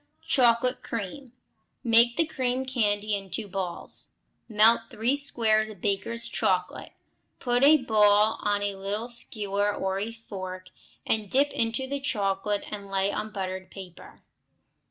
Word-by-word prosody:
Chocolate 250 Hz, 0 st, +3 dB
Creams 230 Hz, +5 st, -6 dB, 0.5 s
Make 235 Hz, 0 st, +5 dB
the 330 Hz, -, +3 dB
cream 260 Hz, -4 st, -2 dB
candy 215 Hz, -5 st, 0 dB
into 200 Hz, +2 st, -4 dB
balls, 185 Hz, -2 st, -1 dB, 0.3 s
melt 225 Hz, +1 st, +4 dB
three 235 Hz, +5 st, 0 dB
squares 225 Hz, -6 st, +1 dB
of 215 Hz, -, -11 dB
Baker's 230 Hz, +2 st, -1 dB
chocolate; -, -, -1 dB, 0.5 s
put 245 Hz, -1 st, 0 dB
a 305 Hz, +2 st, +8 dB
ball 215 Hz, -3 st, +3 dB
on 205 Hz, -1 st, 0 dB
a 200 Hz, -1 st, -2 dB
little 205 Hz, +5 st, -4 dB
skewer 205 Hz, -4 st, -1 dB
or 190 Hz, -1 st, -2 dB
a 215 Hz, +3 st, -3 dB
fork, 185 Hz, -5 st, -8 dB, 0.4 s
and 215 Hz, -2 st, 0 dB
dip 280 Hz, +5 st, +2 dB
into 230 Hz, +3 st, -1 dB
the 280 Hz, +1 st, -3 dB
chocolate 205 Hz, -5 st, -1 dB
and 200 Hz, -2 st, -7 dB
lay 195 Hz, 0 st, 0 dB
on 215 Hz, +1 st, -4 dB
buttered 185 Hz, -2 st, -5 dB
paper. 185 Hz, -3 st, -12 dB
215 Hz, 135 wpm, -27 LUFS, 200-240 Hz, 0.5 s, a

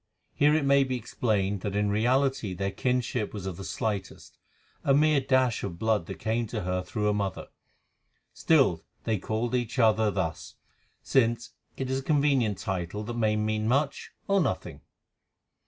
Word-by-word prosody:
Here 150 Hz, +1 st, +4 dB
it 155 Hz, -3 st, +1 dB
may 140 Hz, 0 st, +5 dB
be 130 Hz, -1 st, -2 dB
explained 105 Hz, -4 st, -1 dB
that 100 Hz, 0 st, -3 dB
in 105 Hz, 0 st, +1 dB
reality 120 Hz, -2 st, +1 dB
their 95 Hz, +2 st, -2 dB
kinship 125 Hz, 0 st, -1 dB
was 100 Hz, -3 st, -6 dB
of 95 Hz, -2 st, -4 dB
the 95 Hz, -, -8 dB
slightest, 100 Hz, 0 st, -4 dB, 0.4 s
a 135 Hz, -, +4 dB
mere 150 Hz, -1 st, +4 dB
dash 130 Hz, -3 st, +2 dB
of 85 Hz, -4 st, -4 dB
blood 110 Hz, -3 st, 0 dB
that -, -, -5 dB
came 115 Hz, +1 st, -1 dB
to 110 Hz, 0 st, -4 dB
her 90 Hz, 0 st, -1 dB
through 105 Hz, +3 st, -4 dB
her 105 Hz, -, +3 dB
mother. 100 Hz, -3 st, -3 dB, 0.8 s
Still 135 Hz, -, +3 dB, 0.2 s
they 110 Hz, -3 st, 0 dB
called 110 Hz, +5 st, -2 dB
each 120 Hz, 0 st, -1 dB
other 110 Hz, -2 st, +4 dB
thus, 95 Hz, -5 st, -3 dB, 0.5 s
since 120 Hz, -2 st, +1 dB, 0.3 s
it 135 Hz, -, -3 dB
is 130 Hz, -, 0 dB
a -, -, -8 dB
convenient 140 Hz, -, +2 dB
title 95 Hz, +3 st, -3 dB
that 120 Hz, -, -5 dB
may 110 Hz, -2 st, +1 dB
mean 110 Hz, 0 st, -1 dB
much 140 Hz, +4 st, 0 dB, 0.2 s
or 195 Hz, -1 st, +3 dB
nothing. 90 Hz, -, -3 dB
110 Hz, 170 wpm, -28 LUFS, 100-130 Hz, 0.8 s, may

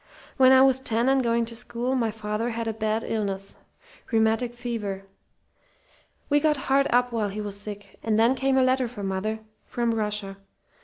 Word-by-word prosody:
When 260 Hz, -1 st, +6 dB
I 260 Hz, 0 st, +7 dB
was 265 Hz, -1 st, +3 dB
ten 235 Hz, -1 st, +1 dB
and 270 Hz, 0 st, +4 dB
going 235 Hz, -1 st, +1 dB
to 230 Hz, 0 st, -5 dB
school 245 Hz, +2 st, -2 dB
my 240 Hz, -4 st, +1 dB
father 215 Hz, +1 st, -3 dB
had 230 Hz, -1 st, -3 dB
a 225 Hz, -, -1 dB
bad 220 Hz, +1 st, -1 dB
illness 195 Hz, -3 st, -3 dB, 0.5 s
rheumatic 225 Hz, +2 st, +1 dB
fever. 220 Hz, -5 st, -4 dB, 1.2 s
We 290 Hz, 0 st, +3 dB
got 300 Hz, 0 st, +2 dB
hard 270 Hz, +1 st, +2 dB
up 245 Hz, 0 st, +3 dB
while 220 Hz, -3 st, -1 dB
he 200 Hz, +2 st, -6 dB
was 205 Hz, -1 st, -5 dB
sick; 205 Hz, -1 st, -9 dB
and 220 Hz, -1 st, +1 dB
then 230 Hz, +3 st, +5 dB
came 265 Hz, 0 st, +1 dB
a 260 Hz, -, +5 dB
letter 255 Hz, 0 st, +2 dB
for 230 Hz, -4 st, -8 dB
mother 195 Hz, +3 st, -2 dB, 0.2 s
from 235 Hz, -1 st, -1 dB
Russia. 210 Hz, -3 st, -3 dB
230 Hz, 185 wpm, -25 LUFS, 210-255 Hz, 1.2 s, I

